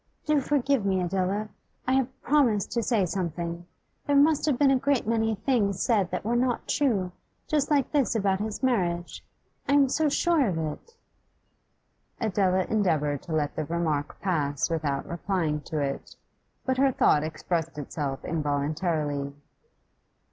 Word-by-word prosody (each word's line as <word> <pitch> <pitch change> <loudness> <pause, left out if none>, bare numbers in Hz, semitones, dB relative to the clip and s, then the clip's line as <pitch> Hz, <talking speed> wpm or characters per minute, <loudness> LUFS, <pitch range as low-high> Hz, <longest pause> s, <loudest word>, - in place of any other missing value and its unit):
'Do 305 -2 +2
forgive 275 -3 +1
me, 190 -1 +1
Adela. 190 +3 -1 0.4
I 260 - +2
have 265 -1 0
promised 245 -8 +2
toto 235 - 0
say 215 -6 +2
something. 170 -1 -4 0.4
There 285 - +2
must 295 +2 +4
have 280 -5 +2
been 280 0 +4
a - - +5
great 275 -1 +1
many 225 0 +1
things 205 -4 0
said 205 -7 +2
that - - -4
were 235 +2 +1
not 245 0 0
true, 205 -11 +1 0.4
just 300 -3 +1
like 285 -4 +2
this 280 -6 +1
about 195 -3 +1
his 215 +4 -4
marriage; 175 -9 0 0.5
I - - +4
am 280 -2 +5
so 310 +3 +2
sure 310 -2 +2
of 180 -5 -1
it.' 160 - -5 1.2
Adela 190 -4 +1
endeavoured 155 -9 0
to 165 - -7
let 150 -2 0
the 155 - -2
remark 160 -3 -2
pass 150 -5 0
without 145 -4 -1
replying 170 -4 -1
to 155 - -4
it. 140 -2 -3 0.5
But 260 0 0
her 275 0 +4
thought 150 -10 +3
expressed 160 +1 -3
itself 140 -1 -4
involuntarily. 150 -1 -1
195 Hz, 155 wpm, -27 LUFS, 160-255 Hz, 1.2 s, a